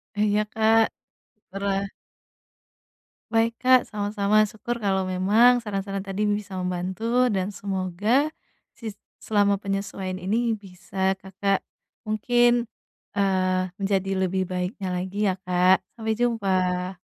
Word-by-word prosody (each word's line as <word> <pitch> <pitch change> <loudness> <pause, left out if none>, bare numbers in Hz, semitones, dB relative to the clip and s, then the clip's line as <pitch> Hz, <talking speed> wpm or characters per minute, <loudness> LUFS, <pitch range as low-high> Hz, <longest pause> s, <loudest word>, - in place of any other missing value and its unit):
Iya 210 0 +2
Kak, 225 0 +4 0.6
terah 195 0 -1 1.4
Baik 230 +1 +1
Kak, 255 -1 +5
sama-sama 210 0 +2
syukur 235 +3 -5
kalau 195 -3 +1
memang 205 +7 +4
saran-saran 195 -2 -3
tadi 195 +2 -3
bisa 205 -2 -1
membantu 185 +7 0
dan 195 -3 -1
semoga 200 - 0 0.4
sis 220 -3 -8 0.2
selama 200 -2 +2
penyesuaian 195 -2 -3
ini 220 +5 0
bisa 190 -1 -3
Kakak 195 +1 -1 0.5
mungkin, 240 +2 +2 0.4
eee, 185 -2 +1
menjadi 195 -1 0
lebih 185 0 0
baiknya 185 +2 -3
lagi 185 +2 -4
ya 185 - +1
Kak, 180 +1 +3 0.2
sampai 220 0 -1
jumpa. 190 -6 0
200 Hz, 110 wpm, -25 LUFS, 190-220 Hz, 1.4 s, Kak